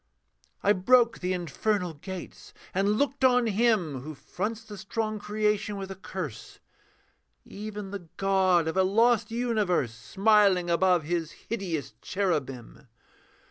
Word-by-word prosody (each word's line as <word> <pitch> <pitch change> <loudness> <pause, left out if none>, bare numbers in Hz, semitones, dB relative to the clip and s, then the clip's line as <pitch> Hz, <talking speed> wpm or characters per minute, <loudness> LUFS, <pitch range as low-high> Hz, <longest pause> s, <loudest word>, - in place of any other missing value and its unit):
I 205 - +5
broke 235 +5 +4
the 180 0 -2
infernal 180 +1 -1
gates 190 - -9 0.2
and 200 +2 +2
looked 280 0 0
on 250 -2 +5
him 210 - +1
Who 155 +3 -8
fronts 210 +10 -4
the 210 -1 -10
strong 215 +1 -3
creation 210 0 -1
with 195 -1 -6
a - - -6
curse; 180 - -7 0.9
Even 210 -1 -7
the 185 -5 -7
god 190 -4 +3
of 160 - -2
a 190 - +4
lost 225 +4 +3
universe, 215 - 0
Smiling 190 - +3
above 180 -1 +3
his 165 0 -2 0.2
hideous 175 - -3
cherubim. 140 - -3
195 Hz, 130 wpm, -27 LUFS, 175-215 Hz, 0.9 s, I